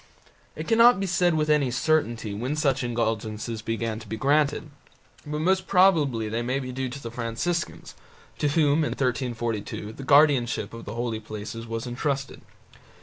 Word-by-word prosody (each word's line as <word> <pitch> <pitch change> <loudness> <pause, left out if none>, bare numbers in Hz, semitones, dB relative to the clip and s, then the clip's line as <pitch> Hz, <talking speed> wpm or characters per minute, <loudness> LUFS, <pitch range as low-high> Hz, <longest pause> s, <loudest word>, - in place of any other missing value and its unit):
It - - -6
cannot 235 0 +6
be 195 - -1
said 175 -2 +2
with 155 -1 +1
any 150 -3 +3
certainty 120 -5 0
when 125 +8 -2
such 140 -4 +1
indulgences 110 -1 -2
began 115 0 -3
to 110 - -12
be 110 - -4
granted, 145 +4 +1 0.6
but 150 +1 -3
most 190 +2 +1
probably 155 - +3
they 115 +2 -2
may 125 +3 -1
be 130 -2 -5
due 130 0 -3
to 135 +3 -7
the 115 -4 -7
Franciscans, 120 +9 -3 0.5
to 150 - +2
whom 145 0 +3
in - - -1
1342 120 -4 -2
the 135 - -9
guardianship 135 -7 +3
of 115 0 -9
the 105 - -6
holy 120 -2 -2
places 110 +2 -7
was 115 +1 -4
entrusted. 135 +3 -3
125 Hz, 165 wpm, -25 LUFS, 115-150 Hz, 0.6 s, cannot